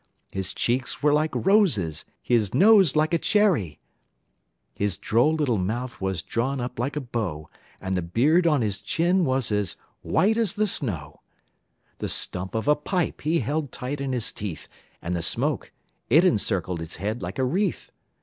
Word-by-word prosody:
His 95 -1 -3
cheeks 125 +3 -1
were 150 -1 +4
like 155 +1 +2
roses, 155 - +2 0.2
his 110 -5 +1
nose 195 -6 +6
like 155 +2 +2
a 170 - +3
cherry; 185 - +2 1.0
His 100 -5 -1
droll 120 - +2
little 135 -9 +1
mouth 120 +7 -3
was 95 -4 -2
drawn 130 +4 -1
up 125 -1 -5
like 135 +5 -2
a - - 0
bow, 105 - -4 0.3
And 95 0 -3
the 90 - 0
beard 145 - +2
on 150 -5 +3
his 100 -3 -2
chin 175 +2 +1
was 130 -4 0
as 105 -4 0 0.3
white 220 +4 +2
as 220 -6 +1
the 215 0 +2
snow; 80 - -2 0.8
The - - -3
stump 95 +3 -2
of 110 +4 -2
a 150 - +5
pipe 175 +3 -2
he 160 +3 +1
held 145 -2 -2
tight 135 +3 -5
in 135 -1 -2
his 120 -3 -1
teeth, 100 -6 -6 0.4
And 90 +2 -2
the 85 - -2
smoke, - - -1 0.4
it 160 +9 +6
encircled 95 - +1
his 80 0 -6
head 105 +5 -3
like 90 +3 -5
a 130 - +1
wreath. 185 +11 -1
125 Hz, 175 wpm, -25 LUFS, 95-155 Hz, 1.0 s, nose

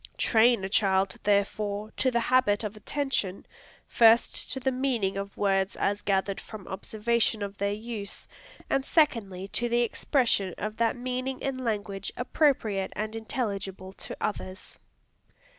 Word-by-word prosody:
Train 225 -2 +4
a - - -1
child, 195 -2 +2
therefore, 205 +1 0
to 260 - +2
the 235 -2 +1
habit 230 -4 +3
of 210 0 -4
attention, 215 -4 -2 0.4
first 230 0 +4
to 265 - -2
the 265 +1 0
meaning 250 -7 0
of 200 0 -5
words 195 -1 +1
as 205 +1 0
gathered 195 0 0
from 215 -4 -10
observation 220 +2 0
of 200 0 -5
their 200 0 +1
use, 210 -1 -6 0.4
and 275 - +1
secondly 220 - +1
to 240 +3 0
the 240 +1 +3
expression 230 -6 +1
of 215 +1 -4
that 230 -1 +2
meaning 255 +1 -3
in 270 -1 -3
language 205 -5 -3
appropriate 245 -8 +1
and 215 +2 -3
intelligible 200 -5 -4
to - - -8
others. 190 -3 -4
215 Hz, 140 wpm, -28 LUFS, 195-240 Hz, 0.4 s, Train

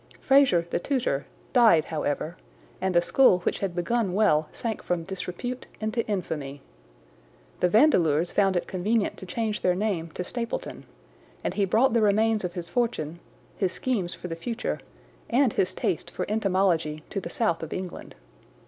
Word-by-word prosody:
Fraser, 270 -12 +4
the - - -1
tutor, 235 - -1 0.3
died 225 - +6
however, 155 +1 -2 0.5
and 190 -1 0
the 175 - +5
school 220 +1 +5
which - - -1
had 190 -3 -2
begun 190 +2 0
well 160 -8 +3
sank 225 -3 -4
from 175 -2 -2
disrepute 190 +7 -5
into 220 +2 -1
infamy. 150 -9 -4 1.0
The 180 - +3
Vandeleurs 175 - +4
found 195 -2 +2
it 175 - 0
convenient 205 +4 0
to 190 - -9
change 220 +1 -2
their 180 -1 +2
name 185 -5 -1
to 180 - -2
Stapleton, 235 +4 -5 0.6
and - - -1
he 200 0 +1
brought 225 +7 +3
the 230 - +3
remains 215 +1 +3
of 180 -1 -3
his 175 -2 -5
fortune, 200 -10 -1 0.4
his 185 -3 0
schemes 200 -9 -1
for - - -7
the 165 - -4
future, 230 +8 -3 0.5
and 255 -1 +3
his 185 - +1
taste 165 - -2
for - - -4
entomology 185 -7 +1
to 195 - -2
the 170 - -6
south 215 -4 0
of 160 - -6
England. 185 -1 -6
190 Hz, 165 wpm, -26 LUFS, 170-225 Hz, 1.0 s, died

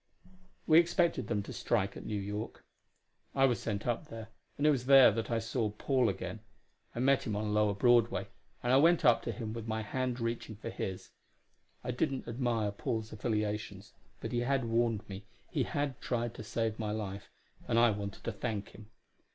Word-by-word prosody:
We 160 0 +7
expected 170 - +2
them 105 -3 -1
to - - -8
strike 100 -4 0
at - - -8
New 105 -2 -2
York. 105 +2 -5 0.7
I 135 - +5
was 120 -6 +2
sent 105 -2 -3
up 120 +5 -1
there, 115 -6 -8 0.3
and 145 - 0
it 150 - +7
was 130 -3 -1
there 135 -3 +9
that 115 +2 -3
I 115 - +1
saw 115 0 -1
Paul 125 +3 +1
again. 95 +1 -4 0.6
I - - -3
met 135 +2 +4
him 105 - -1
on 105 0 -1
lower 105 -1 +2
Broadway, 120 +2 +3 0.4
and 120 +1 +2
I - - +7
went 165 +4 +5
up - - +6
to - - -3
him 110 -3 -5
with 115 -1 -6
my 110 0 -2
hand 125 +3 -2
reaching 115 -1 -3
for 115 +3 -6
his. 95 -1 -5 0.7
I 125 - -2
didn't 130 +1 -1
admire 115 -3 0
Paul's 110 +2 -3
affiliations, 105 -2 -3 0.3
but 115 - -5
he 120 - 0
had 130 +1 +1
warned 115 -2 0
me 100 0 -8 0.2
he - - 0
had 145 -3 -2
tried 120 -1 -2
to - - -8
save 110 0 -2
my 110 -1 -2
life 105 -2 -4 0.4
and 115 - +1
I 120 -1 +6
wanted 100 -1 -5
to - - -2
thank 105 -1 -4
him. 105 0 -14
115 Hz, 195 wpm, -32 LUFS, 105-125 Hz, 0.7 s, there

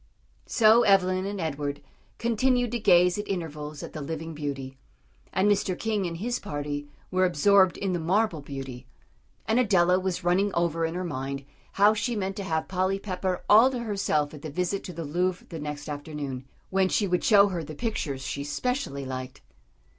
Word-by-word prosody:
So 225 +1 +5
Evelyn 185 -2 +3
and 200 0 -4
Edward 145 -3 -3 0.4
continued 245 +1 +1
to 240 - -1
gaze 180 -2 +4
at 205 - -4
intervals 155 -5 -5
at - - -8
the 155 - -5
living 160 +2 -5
beauty, 135 -3 -5 0.5
and 190 +2 +2
Mr. 195 -3 +1
King 210 -4 -1
and 165 -1 -5
his 240 +6 -2
party 145 -5 -4 0.2
were 185 0 +2
absorbed 185 +2 +4
in 195 -2 -1
the 175 - -1
marble 180 0 +1
beauty; 135 -3 -7 0.6
and 220 +3 +2
Adela 185 -6 +4
was 185 -1 -2
running 190 +4 +2
over 165 -1 +1
in 165 +1 -3
her 180 - -2
mind 135 -3 -4 0.3
how 205 +2 +5
she 235 +3 -1
meant 195 -2 -2
to 200 - -3
have 160 -4 -1
Polly 185 +1 0
Pepper 185 -2 -3
all 225 +5 +7
to 260 - -4
herself 195 -9 0
at 150 - -10
the 155 - -6
visit 180 +6 -2
to - - -6
the 165 0 -5
Louvre 180 +4 -1
the 165 - -6
next 150 -1 -5
afternoon, 145 -3 -5 0.3
when 190 0 +2
she 205 - +1
would 180 -1 0
show 205 -1 +6
her 175 -4 -3
the 155 0 -8
pictures 145 - -3
she 140 +2 -4
specially 145 - -2
liked. 130 0 -6
180 Hz, 185 wpm, -27 LUFS, 150-200 Hz, 0.6 s, all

